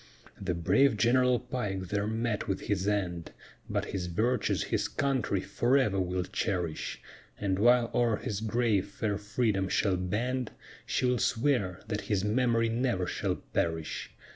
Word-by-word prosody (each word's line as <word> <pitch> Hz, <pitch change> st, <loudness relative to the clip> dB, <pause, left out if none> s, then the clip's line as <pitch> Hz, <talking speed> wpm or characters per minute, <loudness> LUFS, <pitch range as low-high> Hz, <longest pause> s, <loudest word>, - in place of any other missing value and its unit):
The 95 Hz, -3 st, -1 dB
brave 115 Hz, +9 st, +3 dB
General 125 Hz, +4 st, +4 dB
Pike 105 Hz, -8 st, -4 dB
there 100 Hz, +1 st, 0 dB
met 110 Hz, -1 st, -1 dB
with 95 Hz, -1 st, -1 dB
his 100 Hz, -1 st, -1 dB
end; 90 Hz, -5 st, -1 dB, 0.4 s
But -, -, -1 dB
his 90 Hz, -2 st, -2 dB
virtues 110 Hz, +7 st, +1 dB
his -, -, 0 dB
country 130 Hz, -9 st, 0 dB
forever 120 Hz, 0 st, +2 dB
will 90 Hz, 0 st, -1 dB
cherish: 90 Hz, -5 st, -2 dB, 0.4 s
And 95 Hz, -2 st, 0 dB
while 120 Hz, +1 st, +4 dB
o'er 115 Hz, -3 st, +2 dB
his 100 Hz, -2 st, -3 dB
grave 110 Hz, -3 st, +1 dB
fair 100 Hz, 0 st, -2 dB
Freedom 105 Hz, -2 st, 0 dB
shall 95 Hz, -1 st, +2 dB
bend, 115 Hz, +7 st, -1 dB, 0.4 s
She 130 Hz, -, 0 dB
will 125 Hz, -1 st, +2 dB
swear 115 Hz, -8 st, +1 dB
that 105 Hz, -1 st, -2 dB
his 100 Hz, -3 st, +1 dB
memory 115 Hz, +1 st, +2 dB
never 115 Hz, -5 st, 0 dB
shall -, -, -1 dB
perish. 80 Hz, -2 st, -3 dB
105 Hz, 145 wpm, -30 LUFS, 95-120 Hz, 0.4 s, General